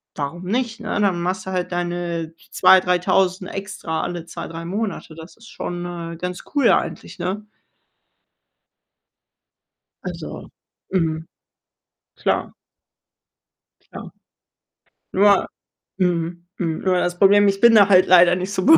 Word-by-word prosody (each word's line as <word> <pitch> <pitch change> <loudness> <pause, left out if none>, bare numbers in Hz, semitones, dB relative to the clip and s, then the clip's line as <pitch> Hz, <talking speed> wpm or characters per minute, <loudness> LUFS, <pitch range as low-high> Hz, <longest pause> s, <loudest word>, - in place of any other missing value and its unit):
warum 150 +5 -5
nicht, 230 +2 -2
ne? 215 - -3
Dann 185 -4 +1
machst 185 +2 -2
du - - -3
halt 180 -1 -2
deine 175 -2 -3 0.2
2- 190 0 +6
3.000 185 +1 +1
extra 195 -5 -4
alle 175 -2 -5
2, - - -7
3 165 0 -7
Monate. 195 -3 -4
Das 165 +2 -12
ist 230 - -15
schon, 175 0 -5 0.3
äh, - - -9
ganz 180 +1 -5
cool 285 - +4
eigentlich, - - -1
ne? 205 +3 -3 2.6
Also, - - -7 0.4
mhm. 160 -3 0 0.9
Klar. - - -1 1.4
Klar. - - -9 1.0
Nur 200 0 +4 0.5
mhm, 175 -1 -1
mhm. 165 -3 -2
Nur 185 -1 +1
das 175 0 -1
Problem, 205 +1 +6
ich 195 0 0
bin 235 -1 +7
da 205 -2 +7
halt 185 -2 +6
leider 175 -1 +6
nicht 185 +2 -4
so 185 - -1
be 320 +3 +8
180 Hz, 130 wpm, -21 LUFS, 175-195 Hz, 2.6 s, be